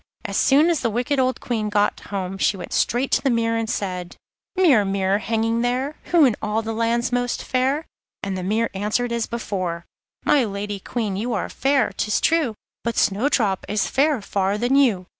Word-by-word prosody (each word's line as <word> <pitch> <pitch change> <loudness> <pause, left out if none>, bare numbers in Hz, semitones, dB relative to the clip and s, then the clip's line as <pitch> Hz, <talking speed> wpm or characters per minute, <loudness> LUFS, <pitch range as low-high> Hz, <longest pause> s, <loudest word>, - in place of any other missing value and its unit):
As 200 -2 -4
soon 295 - +4
as 330 - 0
the 235 - 0
wicked 250 +6 -1
old 255 -1 +1
Queen 220 -3 -2
got 205 0 +1
home 195 -1 -5
she 200 - +2
went 180 - -7
straight 250 +3 +1
to - - +3
her 275 - +2
mirror, 230 -1 +1
and 225 -1 -3
said: 180 -3 -3 0.4
'Mirror, 300 - +4
mirror, 195 0 +1
hanging 225 +1 0
there, 255 +5 -1
Who 340 -4 +5
in 240 -5 +3
all 215 +2 -1
the 225 +1 -3
land's 230 +2 0
most 245 0 -1
fair?' 265 +5 0 0.4
and 195 -1 -2
the 185 - -3
mirror 215 +5 0
answered 210 +5 -1
as 235 -1 -1
before: 185 -7 -3 0.4
'My 285 -3 +4
Lady 205 -1 -4
Queen, 210 -1 -3
you 235 +4 -2
are - - -2
fair, 270 -4 +1
'tis 210 - 0
true, 315 -9 +1 0.3
But 235 -1 -2
Snowdrop 205 -2 +1
is 210 0 +1
fairer 275 -4 +1
far 195 0 0
than 245 +4 +1
you. 230 -10 +3
230 Hz, 195 wpm, -22 LUFS, 200-255 Hz, 0.4 s, Who